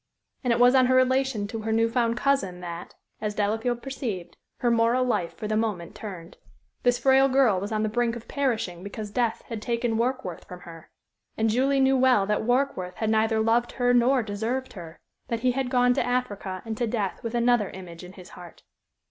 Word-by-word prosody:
And 250 - +1
it 235 - +2
was 245 +1 +6
on 260 -1 +5
her 255 - +3
relation 255 -4 +2
to 225 - -5
her 220 +1 -3
new 225 +1 +3
found 235 0 0
cousin 245 -11 0
that, 170 0 -7 0.3
as 210 -1 -3
Delafield 225 +4 -1
perceived, 235 -10 -5 0.2
her 240 - +1
moral 235 +2 +3
life 180 -9 -1
for 215 - -5
the 215 - -1
moment 210 -6 -2
turned. 185 -4 -9 0.4
This 245 0 +2
frail 270 0 +4
girl 255 -8 +3
was 200 +3 -5
on 215 0 0
the - - +1
brink 235 +2 0
of 235 - -10
perishing 225 -11 -2
because 205 +1 -7
death 235 0 -1
had 225 -3 -5
taken 235 0 -1
Warkworth 235 -7 -2
from 180 0 -10
her. 165 -1 -12 0.5
And 220 0 +2
Julie 270 +4 +2
knew 265 0 +4
well 255 -6 +4
that 210 +1 0
Warkworth 245 -7 0
had 220 -1 -1
neither 220 0 +2
loved 230 +2 +1
her 245 -1 +2
nor 245 +1 +3
deserved 225 +5 -3
her 170 -3 -10 0.3
that 230 -2 -3
he 255 0 +3
had 260 0 -2
gone 250 -1 +3
to 270 - 0
Africa 210 -7 -3
and 225 -1 -4
to 240 - 0
death 210 -4 -2
with 230 +1 -4
another 235 -3 +2
image 180 -2 -10
in 180 +1 -11
his 185 -1 -13
heart. 175 -2 -13
230 Hz, 205 wpm, -26 LUFS, 205-250 Hz, 0.5 s, was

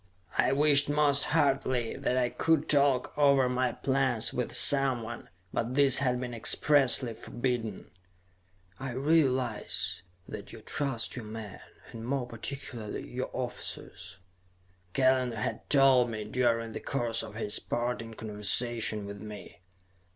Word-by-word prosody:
I - - +2
wished 145 0 +5
most 145 -1 +2
heartily 135 -6 0
that 125 - -1
I 125 -1 +1
could 160 +1 +1
talk 140 -3 +2
over 140 -3 +4
my 125 0 0
plans 130 -4 0
with 125 - -2
someone, 125 -5 +2 0.2
but 120 +2 -2
this 140 -3 +6
had 125 -3 0
been 125 -1 -5
expressly 130 +1 +3
forbidden. 120 -4 -4 0.9
"I 130 -2 -5
realize 130 - 0 0.3
that - - -8
you - - -11
trust 135 -5 -3
your 120 -3 -7
men, 110 -2 -8 0.3
and 115 - -8
more 130 +1 -2
particularly 115 -2 -6
your 130 +1 -4
officers," 95 -7 -6 0.8
Kellen 130 -2 +2
had 110 -2 -4
told 135 -3 +5
me 110 -2 -5
during 115 0 0
the - - -6
course 120 -4 -1
of 110 -2 -9
his 105 -2 -1
parting 120 -2 -3
conversation 110 0 -1
with 100 0 -8
me. 105 -4 -10
125 Hz, 130 wpm, -29 LUFS, 115-135 Hz, 0.9 s, this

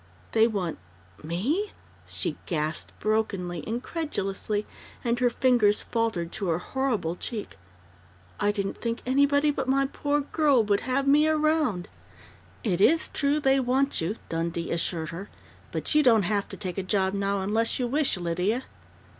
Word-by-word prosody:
"They 225 0 +5
want 190 - -2 0.4
me?" 255 - -1 0.3
she - - -2
gasped 155 -1 -2
brokenly, 195 -6 -1
incredulously, 220 - -2 0.4
and 240 -1 0
her 250 -1 +4
fingers 235 -4 +3
faltered 220 -8 -1
to 200 -3 -3
her 165 -2 +2
horrible 210 -5 -1
cheek. 210 - -6 0.8
"I 205 - +3
didn't 200 -1 -3
think 230 0 -2
anybody 285 +3 +3
but 270 -2 -3
my 275 +1 +3
poor 290 +1 0
girl 285 -4 +3
would 205 -1 +2
have 275 +2 +1
me 295 +2 +5
around 305 - +1 0.4
" - - -26
"It 175 - 0
is 320 +9 +4
true 285 +1 +1
they 270 -1 +3
want 265 0 +1
you," 175 +7 -1
Dundee 170 +1 -2
assured 165 -1 -2
her. 185 +5 -7 0.4
"But - - -2
you 300 - +6
don't 230 -7 +5
have 200 +2 0
to - - -8
take 185 0 -4
a - - 0
job 190 0 +1
now 200 0 0
unless 220 +4 +1
you 250 - 0
wish, 275 -1 +1
Lydia." 180 +8 0
220 Hz, 155 wpm, -27 LUFS, 190-275 Hz, 0.8 s, you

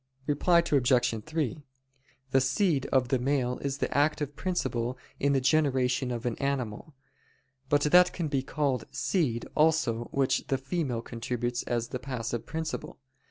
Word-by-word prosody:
Reply 170 +4 +3
Obj. 125 -5 +2
3: 155 -3 -2 0.7
The 135 - +4
seed 140 +2 +1
of 130 -2 +2
the 130 - +2
male 125 -1 0
is 140 -1 -3
the - - -2
active 145 0 +1
principle 125 -10 -2 0.2
in 140 0 +2
the 135 - +3
generation 130 -2 +2
of 120 0 -4
an 120 - 0
animal. 140 +1 -3 0.7
But 145 -1 +3
that 180 +4 +6
can 170 -3 -3
be 140 -2 0
called 135 -2 -1
seed 135 - 0
also 155 -7 +2
which 135 +1 0
the 135 - +1
female 135 -4 -2
contributes 120 +1 -3
as 120 -1 -1
the 125 - -4
passive 120 -3 -4
principle. 160 0 -4
135 Hz, 150 wpm, -29 LUFS, 125-150 Hz, 0.7 s, that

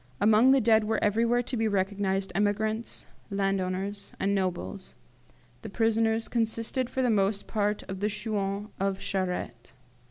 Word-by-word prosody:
"Among 220 +4 +5
the 270 0 +6
dead 220 -2 +4
were 220 - 0
everywhere 230 +3 +2
to 250 - -4
be 225 -1 +1
recognized 195 -1 0
emigrants, 215 +3 -1 0.2
landowners, 195 0 -2
and 200 +1 +1
nobles; 185 0 -3 0.7
the - - -7
prisoners 225 0 +1
consisted 230 +2 -1
for 260 - -1
the 245 - +3
most 200 -1 +1
part 210 -1 -1
of 190 0 -7
the 210 +2 0
'chouans' 205 -1 -3
of 195 0 0
Charette. 180 -11 -3
205 Hz, 145 wpm, -28 LUFS, 195-225 Hz, 0.7 s, the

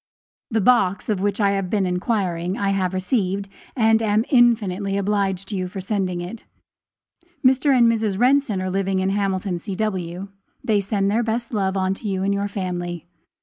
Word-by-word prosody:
The 220 -3 +1
box, 200 -4 +2
of 210 -3 +1
which 205 +1 -1
I 200 -2 +3
had 195 -2 -1
been 200 -1 +1
inquiring, 180 -1 -1
I 200 - 0
have 190 -2 0
received, 195 0 -1 0.3
and 225 -2 +3
am 215 +1 +2
infinitely 210 -6 +3
obliged 195 -1 -1
to 210 - -3
you 185 -1 -2
for 185 +2 -7
sending 190 -2 -2
it. 185 +6 -7 1.0
Mr. 265 +3 +4
and 240 - +5
Mrs. 220 -4 +1
Renson 250 -5 +2
are 185 - -2
living 195 0 0
in 190 +1 0
Hamilton, 195 -2 -1
C.W. 190 -2 -3 0.3
They 210 -3 +2
send 200 0 0
their 225 +3 +2
best 230 +1 -3
love 195 -2 0 0.2
to 210 - -7
you 190 -1 -1
and 200 +1 +1
your 200 0 -1
family. 175 -4 -4
200 Hz, 175 wpm, -22 LUFS, 185-220 Hz, 1.0 s, and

